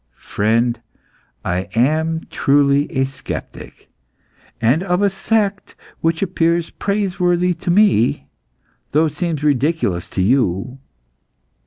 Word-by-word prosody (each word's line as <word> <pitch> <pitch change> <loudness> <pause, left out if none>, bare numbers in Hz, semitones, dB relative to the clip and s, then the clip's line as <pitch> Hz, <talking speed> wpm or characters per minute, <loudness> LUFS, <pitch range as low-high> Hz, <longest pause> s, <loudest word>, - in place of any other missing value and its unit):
"Friend, 115 +3 0 0.7
I 90 +2 -2
am 160 +6 +1
truly 140 0 +2
a 135 0 +1
sceptic, 135 0 -8 0.7
and 125 +8 +2
of 180 +1 0
a 200 - +3
sect 200 0 -1 0.2
which 165 +2 0
appears 170 -2 0
praiseworthy 180 -3 0
to 170 +1 -6
me, 180 - +3 0.7
though 155 +2 +4
it 155 - -3
seems 160 -2 -3
ridiculous 145 - 0
to 95 - -1
you. 125 +2 0
155 Hz, 110 wpm, -19 LUFS, 125-180 Hz, 0.7 s, though